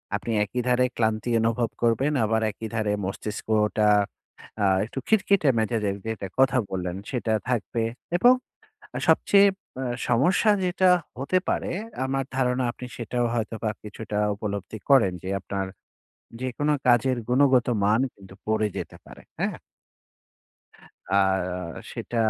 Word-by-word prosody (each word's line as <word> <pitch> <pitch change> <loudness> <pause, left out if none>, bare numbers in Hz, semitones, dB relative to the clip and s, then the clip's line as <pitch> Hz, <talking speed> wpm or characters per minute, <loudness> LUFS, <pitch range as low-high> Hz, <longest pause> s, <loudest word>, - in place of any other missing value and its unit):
আপনি 105 +3 -3
একই 125 +5 -3
ধারে 125 0 +3
ক্লান্তি 110 0 0
অনুভব 115 +1 +1
করবেন, 120 +5 +2
আবার 110 +1 +1
একই 110 +2 -7
ধারে 110 -2 0
মস্তিষ্কটা 105 +2 0 0.8
আ - - +4 0.2
একটু 130 +4 -6
খিটখিটে 200 -7 +3
মেজাজের 110 -3 0
যেটার 105 -4 -4
কথা 130 0 +4
বললেন 90 -1 -3 0.2
সেটা 120 -3 -1 0.2
থাকবে 115 -1 -1 0.3
এবং 245 +7 +7 0.8
সবচেয়ে 200 0 +5 0.3
আ - - -2 0.3
সমস্যা 160 - +4
যেটা 180 +1 +3 0.3
হতে 140 +8 +1
পারে - - -1 0.4
আমার 135 +1 -1
ধারণা 125 -1 +1
আপনি 125 - -9
সেটাও 120 +1 -1
হয়তো 115 -1 -2
বা 110 - +1
কিছুটা 105 0 -7 0.2
উপলব্ধি 100 0 -5
করেন 120 -10 +5
যে, - - -6
আপনার 95 0 -3 0.8
যেকোনো 135 +4 0
কাজের 125 +1 +4
গুণগত 130 -1 +4 0.2
মান 105 +4 +3
কিন্তু 95 -1 -14
পড়ে 110 0 +2
যেতে - - -6
পারে। - - -13 0.2
হ্যাঁ? - - -1 1.5
আ - - -13
আর 90 -3 0
সেটা 120 - -6
115 Hz, 130 wpm, -25 LUFS, 105-130 Hz, 1.5 s, এবং